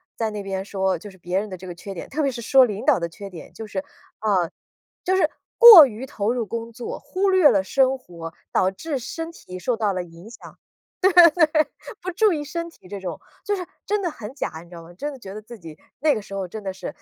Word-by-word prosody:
在 225 -1 -1
那 210 -1 -6
边 195 -1 -3
说 190 -1 -1
就 210 - -10
是 190 - -16
别 180 +1 -1
人 210 +1 -5
的 185 - -7
这 185 - -11
个 180 - -6
缺 190 +3 -9
点， - - -7
特 310 +3 -3
别 275 - +1
是 240 - -7
说 260 +3 +5
领 210 -3 -5
导 - - +4
的 170 - -3
缺 200 +4 -9
点， 175 -4 -11
就 225 - -8
是， 200 -2 -4
呃， 190 -2 -3 0.5
就 375 - +1
是 - - +4 0.3
过 430 - +12
于 235 +2 -7
投 215 -3 -2
入 240 -2 -1
工 230 +3 -5
作 240 +1 -6
忽 385 +1 0
略 370 -6 +6
了 195 -5 +2
生 265 +5 +2
活， 170 -9 -9 0.2
导 185 - +3
致 275 +8 -4
身 325 +6 -6
体 185 - -10
受 240 +6 -1
到 215 -3 0
了 185 -1 -3
影 170 +4 -13
响。 235 - -13 0.8
对， 330 -3 +6 0.6
不 370 - -3
注 420 +3 +3
意 305 -3 -2
身 335 +4 -5
体 255 - -18
这 200 - -6
种， 185 -3 -6 0.2
就 410 - 0
是 370 -2 -4 0.2
真 415 -1 0
的 350 - -1
很 230 -2 -9
假 275 - -3
你 - - -19
知 175 - -13
道 170 - -9
吗， 165 +1 -14
真 290 +10 -5
的 275 - -10
觉 190 -4 -9
得 210 - -7
自 220 0 -12
己 160 -2 -11 0.2
那 305 0 +4
个 - - -3
时 200 - -10
候 195 -2 -3
真 215 +3 -8
的 190 - -3
是， 185 -1 -7
215 Hz, 275 characters per minute, -23 LUFS, 190-280 Hz, 0.8 s, 过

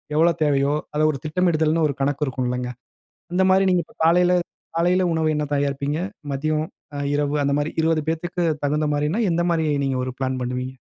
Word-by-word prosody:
எவ்ளோ 165 +2 +5
தேவையோ, 140 -1 +2 0.2
அத 150 - +1
ஒரு 140 - -6
திட்டமிடுதல்ன்னு 160 -1 +2
ஒரு 140 - -3
கணக்கு 145 +2 0
இருக்கும் 130 -1 -2
இல்லங்க! 125 0 -2 0.6
அந்த 185 +1 +2
மாரி 190 +1 +4
நீங்க 180 -1 +2
இப்ப - - -23
காலைல 175 +2 +4 0.4
காலைல 180 +2 +3
உணவு 160 -1 +1
என்ன 150 - 0
தயாரிப்பீங்க? 140 +1 -1 0.3
மதியம், 155 +3 -1 0.3
அ - - -4 0.2
இரவு 145 0 0
அந்த 140 - +1
மாரி 145 +1 -1
20 160 0 +2
பேத்துக்கு 175 +2 -2 0.2
தகுந்த 150 +1 +1
மாரின்னா, 150 +9 0
எந்த 170 +1 +1
மாரி 160 -2 +1 0.2
நீங்க 135 -1 0
ஒரு 130 - -4
ப்ளான் 130 -1 -1
பண்ணுவீங்க? 125 +1 -3
150 Hz, 180 wpm, -22 LUFS, 140-165 Hz, 0.6 s, எவ்ளோ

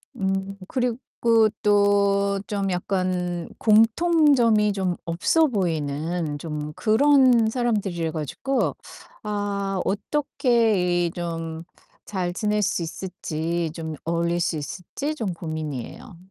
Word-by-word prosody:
음 195 0 -2
그리고 235 -2 +1
또 205 -1 +4 0.3
좀 200 -2 -1
약간 180 -1 -2
공통점이 230 -1 +4
좀 190 -3 -1
없어 175 - +2
보이는 160 - -2
좀 150 -1 -5
그런 245 - +4
사람들이어 205 -9 -1
가지고 160 - -2 0.5
아 200 -2 -2
어떻게 220 - +1
이 - - -4
좀 165 -1 -5 0.4
잘 180 -3 -2
지낼 210 +2 0
수 195 -2 0
있을지 170 -1 -3
좀 160 -1 -6
어울릴 170 +1 0
수 165 -2 0
있을지 180 - -5
좀 225 -10 -3
고민이에요. 155 - -6
195 Hz, 205 characters per minute, -24 LUFS, 170-220 Hz, 0.5 s, 또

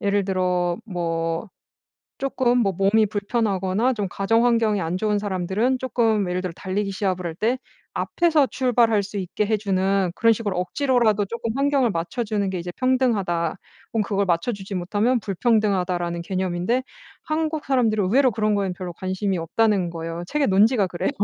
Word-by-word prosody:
예를 200 -1 +1
들어 180 -1 0
뭐 165 0 -2 0.7
쪼끔 250 -2 +1
뭐 200 -4 +2
몸이 200 +4 +3
불편하거나 205 +1 0
좀 210 -5 -2
가정 225 +6 +1
환경이 225 -4 +2
안 165 0 -2
좋은 210 +2 0
사람들은 205 +6 0
쪼끔 225 -7 +1
예를 180 - -1
들어 180 -3 -4
달리기 195 +1 -2
시합을 185 -2 -2
할 165 -1 -4
때 230 +7 0 0.4
앞에서 325 -4 +2
출발할 235 -5 +2
수 205 +1 -9
있게 190 +3 -2
해 215 +1 +1
주는 195 -2 0
그런 230 0 +4
식으로 210 -4 -3
억지로라도 230 -1 +1
쪼끔 230 +2 -4
환경을 275 -4 +2
맞춰주는 205 +3 -2
게 185 -2 -3
이제 175 - -6
평등하다 215 -11 +1 0.4
혹은 225 - +2
그걸 200 -1 0
맞춰주지 195 +3 -2
못하면 205 +7 +1
불평등하다라는 185 -5 0
개념인데 185 +6 -1 0.4
한국 315 -1 -2
사람들은 225 -6 +2
의외로 255 +6 +3
그런 215 0 0
거엔 195 -2 0
별로 180 -1 -6
관심이 190 +1 -2
없다는 190 +2 +1
거예요. 165 +1 -5
책의 295 +3 +1
논지가 205 +1 +4
그래요. 175 +7 -2
205 Hz, 380 characters per minute, -23 LUFS, 185-230 Hz, 0.7 s, 그런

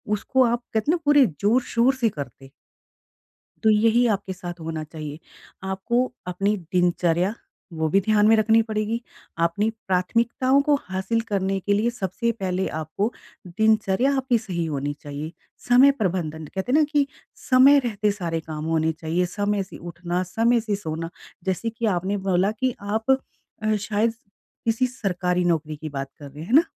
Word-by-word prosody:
उसको 260 +5 +2
आप 235 0 0
कहते 220 +7 +1
ना 350 - +2
पूरे 290 -2 +6 0.2
ज़ोर-शोर 240 +3 +3
से 240 -3 +1
करते। 135 - -9 1.1
तो 220 - +5
यही 225 +3 +4
आपके 195 -1 -7
साथ 180 -2 -8
होना 160 -1 -4
चाहिए, 155 -1 -8 0.4
आपको 210 +7 0 0.2
अपनी 195 +4 0 0.2
दिनचर्या 180 +1 +2 0.5
वो 160 - +2
भी 195 - +4
ध्यान 210 +1 +3
में 225 - +6
रखनी 220 +1 +4
पड़ेगी 215 +2 -1 0.4
अपनी 200 +6 0 0.2
प्राथमिकताओं 235 +8 +2
को 290 - +6
हासिल 190 +5 -1
करने 195 -1 0
के 205 +2 0
लिए 215 +4 +2
सबसे 235 +1 -2
पहले 185 0 -1
आपको 160 +8 -2 0.4
दिनचर्या 220 +5 +2
आपकी 255 -2 +2
सही 180 -6 -3
होनी 145 -2 -2
चाहिए। 145 +2 -6 0.4
समय 255 +3 +7
प्रबंधन, 165 -6 -2
कहते 190 +9 -4
हैं 285 - +5
ना - - +5
कि 290 -2 +3 0.4
समय 265 +2 +7
रहते 210 -2 0
सारे 170 -5 -3
काम 155 -1 -5
होने 160 0 +1
चाहिए 165 +2 -1
समय 205 +2 -1
से 190 - -12
उठना, 175 +1 -3
समय 230 +6 +2
से 215 -2 -1
सोना, 165 -4 -4 0.3
जैसे 190 +5 -1
कि 225 +1 -4
आपने 190 +3 -1
बोला 190 +2 +3
कि 245 +3 -1
आप 220 +5 0 0.5
अ, 215 0 +2
शायद 215 +2 0 0.5
किसी 230 +2 +2
सरकारी 180 -6 -1
नौकरी 155 -3 0
की 155 +1 -7
बात 135 -1 -5
कर 145 -2 -9
रहे 145 +2 -10
हैं। - - -7
हैं 230 - -3
ना? 315 - +8
195 Hz, 165 wpm, -24 LUFS, 170-230 Hz, 1.1 s, ना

